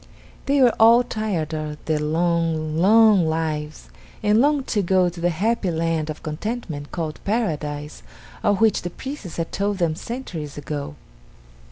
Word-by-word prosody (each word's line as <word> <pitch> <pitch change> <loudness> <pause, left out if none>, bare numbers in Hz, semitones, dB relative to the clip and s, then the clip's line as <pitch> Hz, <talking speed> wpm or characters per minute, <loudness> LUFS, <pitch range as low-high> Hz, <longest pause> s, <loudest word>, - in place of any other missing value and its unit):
They 280 0 +3
were 245 -2 +5
all 230 +2 +7
tired 200 -9 -3
of 155 -1 -4
their 155 -1 0
long, 160 0 0
long 210 +2 +5
lives, 155 -1 -3 0.3
and 210 +2 +4
longed 290 -1 +2
to 210 - +1
go 185 -1 +3
to 170 0 -9
the 175 - +2
happy 200 +4 0
land 165 -1 -1
of 155 - -6
contentment 155 -2 -5
called 160 -3 -4
Paradise 150 -9 -2 0.4
of 205 -2 +2
which 225 -1 +3
the 175 - -4
priests 240 - -8
had 165 -1 -3
told 200 0 -1
them 170 -3 +1
centuries 165 - -6
ago. 145 0 -5
170 Hz, 155 wpm, -22 LUFS, 155-215 Hz, 0.4 s, all